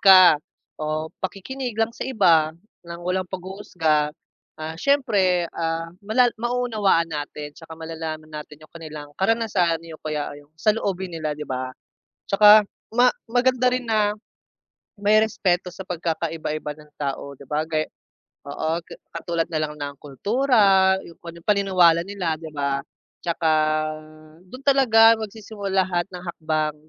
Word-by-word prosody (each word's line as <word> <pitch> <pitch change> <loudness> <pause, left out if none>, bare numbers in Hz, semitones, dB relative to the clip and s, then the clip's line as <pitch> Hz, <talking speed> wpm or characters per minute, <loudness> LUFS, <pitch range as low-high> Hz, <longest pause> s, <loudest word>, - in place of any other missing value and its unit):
ka 185 -6 +8 0.4
o 155 +1 -2
pakikinig 235 +6 -4
lang 225 +1 +1
sa 245 - -5
iba 165 -9 +3 0.3
ng 170 0 -8
walang 185 0 -1
paghuhusga. 180 -5 -1 0.5
Ah, 160 +1 -5
siyempre, 205 -11 +2
ah, 165 0 -3
mala 235 +4 +3
mauunawaan 220 -9 +1
natin 145 0 -5
'tsaka 160 +1 -12
malalaman 160 -1 -6
natin 150 0 -9
yung - - -20
kanilang 155 -3 -9
karanasan, 190 -6 +1
o 155 - -11
kaya 150 -1 -3
ay 145 - -11 0.2
sa 215 +6 +3
loobin 190 -4 -3
nila 155 -2 -3
'di 150 - -5
ba? 130 -1 -3 0.6
Tsaka 210 +1 +8 0.3
ma 245 +1 +6 0.2
maganda 250 +1 +2
rin 255 - -1
na, 210 -2 +2 0.8
may 210 +1 +4
respeto 185 -4 +1
sa 185 +2 -9
pagkakaiba-iba 165 -3 -3
ng 150 0 -17
tao 140 0 -4
'di 140 - -14
ba 150 +3 -2
gay 155 -1 0 0.6
oo 155 +3 -3
ga - - -12 0.3
katulad 170 -1 -1
nalang 155 -1 -2
ng 145 -1 -4
kultura, 195 - +3
yung 170 - -12
kung 170 - -8
anong 170 0 -12
paniniwala 185 -5 +4
nila 185 -3 -2
'di 160 - -7
ba, 140 -2 -1 0.4
tsaka 170 -1 0 0.9
dun 255 +9 -13
talaga 230 -5 +6
magsisimula 205 -3 -2
lahat 175 0 -1
ng 180 -1 -9
hakbang, 155 -3 -1
175 Hz, 140 wpm, -23 LUFS, 155-210 Hz, 0.9 s, ka